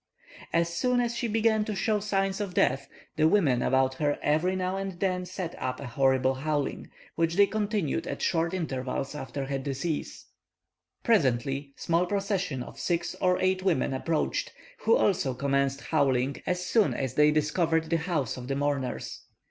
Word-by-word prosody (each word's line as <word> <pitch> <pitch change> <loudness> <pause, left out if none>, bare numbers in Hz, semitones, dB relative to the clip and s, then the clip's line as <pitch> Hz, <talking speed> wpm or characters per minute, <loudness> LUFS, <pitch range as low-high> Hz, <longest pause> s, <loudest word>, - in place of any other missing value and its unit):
As 170 0 +1
soon 250 +7 +2
as 240 -1 0
she 240 0 -1
began 220 0 +2
to 215 - -3
show 210 +2 +1
signs 195 -1 -1
of 195 -3 -4
death, 135 +2 +2 0.3
the 155 0 +5
women 155 -10 +3
about 130 0 +2
her 145 -1 +1
every 160 +5 +2
now 185 0 -1
and 195 -2 -4
then 180 -1 -1
set 180 -2 -5
up 130 0 -2
a 140 - -6
horrible 130 +1 +2
howling, 145 +1 -2 0.2
which 165 0 0
they 200 +1 +7
continued 205 -7 -1
at - - -4
short 165 -1 +1
intervals 135 -6 -3
after 135 -1 -5
her 135 0 -2
decease. 140 +4 -4 0.8
Presently, 140 - +1
small 170 +2 +1
processions 195 - -1
of - - -11
six 170 -1 -1
or 180 -1 +3
eight 185 0 +2
women 175 -8 +1
approached, 155 +4 -1 0.3
who 465 - +4
also 175 - +1
commenced 140 +1 0
howling 135 0 +1
as 180 0 -1
soon 220 -1 +2
as 130 -3 -2
they 150 0 +5
discovered 160 +2 +1
the 165 - +4
house 160 -8 -2
of 125 -1 -7
the 135 - -1
mourners. 140 -3 -2
165 Hz, 170 wpm, -28 LUFS, 135-190 Hz, 0.8 s, they